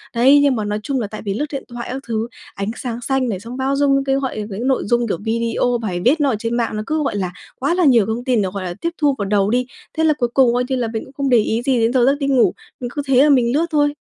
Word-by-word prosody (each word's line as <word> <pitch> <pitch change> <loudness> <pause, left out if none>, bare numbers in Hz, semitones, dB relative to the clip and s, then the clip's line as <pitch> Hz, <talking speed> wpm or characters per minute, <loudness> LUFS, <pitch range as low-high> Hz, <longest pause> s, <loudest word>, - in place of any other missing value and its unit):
Đấy, 270 +5 +6
nhưng 280 -3 +3
mà 215 -2 -2
nói 210 +1 -2
chung 270 0 -1
là 215 - -2
tại 215 - -8
vì 200 - -1
lướt 290 +8 -1
điện 275 -2 -4
thoại 240 -1 -7
các 265 +1 -4
thứ, 225 0 -2 0.3
ánh 200 +1 -3
sáng 240 -2 -5
xanh 265 0 0
này, 190 -5 -3
xong 235 +4 -8
bao 270 +1 0
dung 275 -1 +2
cái 270 0 +1
gọi 265 -4 -2
những 220 +6 -3
nội 265 - +1
dung, 240 +2 +1
kiểu, 185 - -1
video, 230 +2 0
bài 180 -5 -3
viết 290 +6 +4
nó 285 - +3
ở 240 - +1
trên 230 +1 -2
mạng 230 -2 -1
nó 215 - -3
cứ, 310 -1 0
gọi 240 - -2
là, 185 -3 -2 0.3
quá 280 +5 +1
là 355 -1 +2
nhiều 235 -7 +5
thông 225 +2 -3
tin 245 -4 +2
để, 190 - -1
gọi 200 - -4
là, 180 -1 -4
tiếp 335 - 0
thu 290 -3 +2
vào 200 - -2
đầu 200 0 +1
đi. 250 +2 +1 0.3
Thế 320 - +2
là 315 - +4
cuối 240 - 0
cùng 255 -3 +4
coi 245 - +1
như 265 - +1
là 245 -3 -1
mình 220 - -3
cũng 260 - -17
không 275 0 -1
để 245 - +5
ý 225 +2 +1
gì 255 -1 +1
đến 230 +2 +2
giờ 250 -2 +4
giấc 275 +2 +4
đi 275 - -1
ngủ, 265 -3 +3 0.3
mình 245 -2 -4
cứ 290 - -2
thế 265 0 +5
là 300 - +4
mình 250 -4 +3
lướt 330 +3 +2
thôi. 290 -1 +2
245 Hz, 320 wpm, -19 LUFS, 225-275 Hz, 0.3 s, Đấy